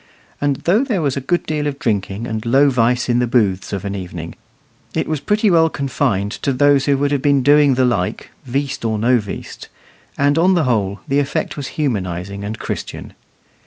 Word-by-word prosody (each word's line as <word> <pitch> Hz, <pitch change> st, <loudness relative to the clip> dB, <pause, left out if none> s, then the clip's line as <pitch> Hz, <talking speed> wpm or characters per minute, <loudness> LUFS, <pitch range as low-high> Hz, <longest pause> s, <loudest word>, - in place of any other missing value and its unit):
And 145 Hz, -1 st, +1 dB
though 205 Hz, +9 st, +3 dB
there 215 Hz, -, -1 dB
was 140 Hz, -3 st, 0 dB
a 140 Hz, -, -2 dB
good 175 Hz, +7 st, -1 dB
deal 150 Hz, -1 st, -1 dB
of 140 Hz, -2 st, -3 dB
drinking 105 Hz, -2 st, -2 dB
and 110 Hz, -2 st, -4 dB
low 135 Hz, +4 st, +4 dB
vice 125 Hz, 0 st, +1 dB
in 120 Hz, -1 st, +2 dB
the 125 Hz, -, +1 dB
booths 105 Hz, -6 st, +1 dB
of 100 Hz, -1 st, -4 dB
an 100 Hz, -, -3 dB
evening, 90 Hz, -4 st, -6 dB, 0.6 s
it -, -, 0 dB
was 155 Hz, -2 st, -1 dB
pretty 210 Hz, +5 st, +1 dB
well 165 Hz, -1 st, +4 dB
confined 130 Hz, -9 st, -1 dB
to 140 Hz, -, 0 dB
those 140 Hz, +1 st, +3 dB
who 140 Hz, -1 st, +2 dB
would 145 Hz, +1 st, 0 dB
have 140 Hz, -2 st, 0 dB
been 140 Hz, -2 st, +3 dB
doing 145 Hz, -1 st, +5 dB
the 130 Hz, 0 st, +3 dB
like, 100 Hz, -7 st, -2 dB
"veast 135 Hz, +2 st, -3 dB
or 110 Hz, -1 st, 0 dB
no 120 Hz, +3 st, +3 dB
veast;" 105 Hz, -2 st, -8 dB, 0.5 s
and 145 Hz, +2 st, +2 dB
on 185 Hz, +2 st, +4 dB
the 170 Hz, -, +2 dB
whole, 100 Hz, -6 st, 0 dB
the 140 Hz, +1 st, +2 dB
effect 140 Hz, -1 st, -2 dB
was 140 Hz, -3 st, -5 dB
humanising 100 Hz, -, -2 dB
and 105 Hz, +2 st, -4 dB
Christian. -, -, -6 dB
130 Hz, 200 wpm, -19 LUFS, 105-145 Hz, 0.6 s, doing